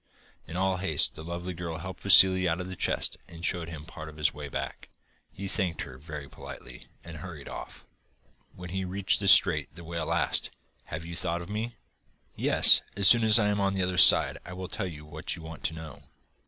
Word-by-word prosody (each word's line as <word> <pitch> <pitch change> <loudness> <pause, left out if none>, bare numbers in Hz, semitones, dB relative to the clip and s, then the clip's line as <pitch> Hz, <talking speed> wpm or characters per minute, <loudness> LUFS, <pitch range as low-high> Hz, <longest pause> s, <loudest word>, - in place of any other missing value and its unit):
In 80 +2 -7
all 95 0 0
haste 80 -5 +2
the 80 - -10
lovely 85 +2 -6
girl 85 -1 -6
helped 90 +2 -9
Vassili 95 -2 +6
out 85 +2 -2
of 90 - -5
the 95 - -7
chest, - - -2
and 85 0 -8
showed 85 -2 -2
him 80 -2 -9
part 80 -1 -10
of 75 - -14
his 75 -1 0
way 75 -1 -8
back. - - -6 0.4
He 100 - -7
thanked 95 -5 0
her 65 0 -12
very 75 -1 -9
politely, - - -11 0.2
and 85 -1 -10
hurried 85 -6 -10
off. - - -10 0.7
When 90 -1 -10
he 95 +1 -3
reached 95 +1 0
the 100 - -3
strait 75 -7 +5
the 85 - -10
whale 85 -1 -5
asked: - - 0 0.4
'Have 80 +2 -7
you 85 0 -8
thought 85 0 0
of 85 - -13
me?' 110 +3 -5 0.6
'Yes, - - +6 0.2
as 100 -2 +5
soon 115 +3 +6
as 110 0 +7
I 105 -3 +2
am 100 0 -1
on 100 0 0
the 95 - -1
other 90 0 -1
side - - +6
I 90 - -10
will 90 0 -7
tell 95 0 -5
you 75 -4 -10
what 75 - -5
you 85 - -11
want 80 0 -10
to 80 0 -1
know. 80 -1 -10
85 Hz, 220 wpm, -27 LUFS, 80-95 Hz, 0.7 s, as